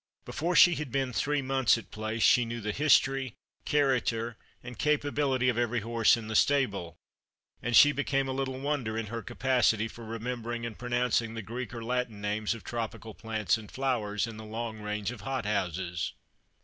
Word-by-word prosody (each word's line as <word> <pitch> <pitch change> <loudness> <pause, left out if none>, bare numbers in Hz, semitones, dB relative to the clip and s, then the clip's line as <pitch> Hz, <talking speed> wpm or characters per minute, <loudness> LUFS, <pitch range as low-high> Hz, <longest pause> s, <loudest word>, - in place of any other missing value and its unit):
Before 175 +3 -2
she 175 - +8
had 150 -5 -4
been 135 -1 -1
three 145 +3 0
months 130 -3 +3
at 115 - -11
Place 110 +1 -3
she 125 - +6
knew 115 0 -4
the 105 -1 -3
history, 135 -1 +2 0.3
character, 120 -5 +1 0.3
and 120 -2 -9
capability 145 -3 +1
of 120 -2 +2
every 120 -1 0
horse 115 +1 +3
in 110 -2 -7
the 110 - -4
stable; 105 -13 +1 0.6
and 120 0 0
she 145 - +9
became 140 -1 0
a - - -2
little 130 -1 -3
wonder 135 -6 -2
in 115 - -2
her 115 - -3
capacity 120 -3 +1
for 115 +1 -11
remembering 115 +1 -4
and 115 -2 -5
pronouncing 120 -2 0
the 115 - -5
Greek 120 +3 -5
or 115 -1 -6
Latin 125 -2 -2
names 105 +2 -1
of 115 - -11
tropical 115 -1 -5
plants 110 0 -1
and 105 - -12
flowers 115 -6 -1
in 115 -2 -8
the 110 - -8
long 110 0 -5
range 105 +1 -3
of 120 -5 -9
hot 135 -1 -3
houses. 90 -4 -2
120 Hz, 185 wpm, -29 LUFS, 110-130 Hz, 0.6 s, she